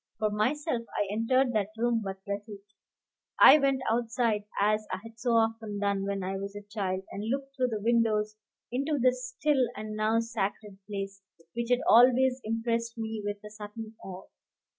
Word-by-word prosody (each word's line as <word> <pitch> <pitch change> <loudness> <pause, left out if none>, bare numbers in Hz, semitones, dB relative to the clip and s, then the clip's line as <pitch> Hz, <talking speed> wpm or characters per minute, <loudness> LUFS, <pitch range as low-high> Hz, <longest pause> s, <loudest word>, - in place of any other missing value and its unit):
For 215 -1 0
myself, 250 +5 0 0.2
I 205 - +1
entered 245 +4 +2
that 210 -2 0
room 235 0 +1
but 195 -1 -5
little. 205 +1 -5 0.8
I 300 - +10
went 275 -2 +1
outside, 230 -2 0
as 215 +1 +2
I - - -1
had 225 0 -12
so 245 -1 0
often 225 -2 +1
done 200 -1 0
when 200 -1 -2
I 190 +1 -2
was 200 +1 -6
a 205 - -7
child, 195 -2 -3
and 210 +3 -4
looked 275 +1 -3
through 255 -2 +1
the 220 -3 -3
windows 220 -2 +2 0.4
into 280 +4 0
the 255 -1 +4
still 255 +2 0
and 215 0 -6
now 215 +1 +2
sacred 210 -3 -3
place, 195 -1 -5 0.3
which 235 0 -3
had 250 +1 +3
always 255 +2 +6
impressed 230 +1 -2
me 220 -1 -4
with 205 0 -4
a 210 - -9
certain 215 +1 -8
awe. 190 0 -8
225 Hz, 175 wpm, -29 LUFS, 205-245 Hz, 0.8 s, I